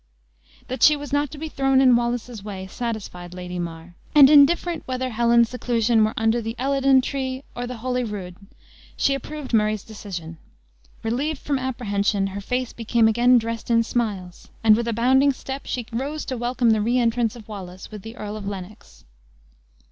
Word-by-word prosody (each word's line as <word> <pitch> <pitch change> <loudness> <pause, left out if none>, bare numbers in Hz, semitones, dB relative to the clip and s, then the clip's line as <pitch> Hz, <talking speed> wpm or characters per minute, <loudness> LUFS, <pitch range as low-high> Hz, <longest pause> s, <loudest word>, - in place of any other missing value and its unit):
That 255 -1 -5
she 300 - +7
was 290 -1 -8
not 290 0 +1
to 300 - -10
be 315 +2 -5
thrown 270 -3 +2
in 255 -2 +6
Wallace's 235 -2 -2
way 195 -2 -6
satisfied 190 -5 -6
Lady 180 0 -6
Mar; 170 0 -6 0.2
and 285 -1 +9
indifferent 320 +3 +5
whether 255 0 -2
Helen's 235 0 +3
seclusion 235 -2 +2
were 215 - 0
under 225 +2 +2
the 225 +1 -5
Elidon 270 +1 +3
tree 265 0 -3
or 245 0 -4
the 250 -1 -6
Holyrood, 220 -7 -3 0.6
she 275 - +2
approved 275 0 -6
Murray's 215 -2 +2
decision. 175 -7 -8 0.6
Relieved 270 +7 -1
from 280 -1 -2
apprehension, 205 -6 -1
her 195 +1 -5
face 250 +4 -2
became 230 0 +2
again 240 +3 +5
dressed 230 0 -3
in 230 -1 +4
smiles, 205 -7 -3 0.2
and, 215 -1 +7
with 235 +1 -2
a 230 - 0
bounding 265 +5 +4
step, 265 +1 -7
she 245 -2 -3
rose 285 +6 -3
to 260 - -3
welcome 240 0 +1
the 215 -1 +2
re 235 +4 +1
entrance 235 -1 +1
of 225 -3 -12
Wallace 190 -3 -9
with 210 -2 -8
the 225 +3 -9
Earl 210 0 -5
of 205 -2 -6
Lennox. 200 +1 -9
235 Hz, 180 wpm, -23 LUFS, 210-260 Hz, 0.6 s, and